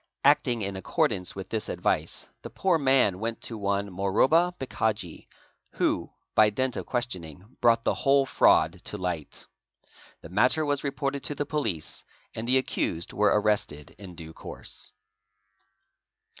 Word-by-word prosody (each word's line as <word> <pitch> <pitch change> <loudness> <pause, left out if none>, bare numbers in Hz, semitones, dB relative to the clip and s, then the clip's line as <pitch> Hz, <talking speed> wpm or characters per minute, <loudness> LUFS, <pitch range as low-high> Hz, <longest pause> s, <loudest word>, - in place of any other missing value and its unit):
Acting 135 -6 +3
in 100 0 -3
accordance 90 -1 0
with 95 -1 -7
this 110 -1 -3
advice, - - -1
the - - -8
poor 180 -4 +1
man 130 -9 +3
went 115 +1 -3
to 115 - -3
one 100 -1 -1
Moroba 130 - +3
Bhikhaji 110 -9 -2 0.5
who, - - 0 0.2
by 110 -1 +6
dint 130 +4 -1
of - - -5
questioning, 95 - -4
brought 115 -1 +4
the - - +2
whole 140 0 +3
fraud 85 -7 +3
to 105 - -3
light. 90 -6 -4 0.8
Thi - - -9
matter 125 - +3
was 145 -1 0
reported 140 -1 -2
to 145 - -1
the 145 - -2
Police, 110 - -3 0.3
and 110 +1 -5
the 130 +2 +4
accused 85 -9 -1
were 105 0 +3
arrested 100 -9 -1
in 95 -3 -10
du 80 -1 -9
course. - - -7
110 Hz, 145 wpm, -27 LUFS, 95-135 Hz, 0.8 s, by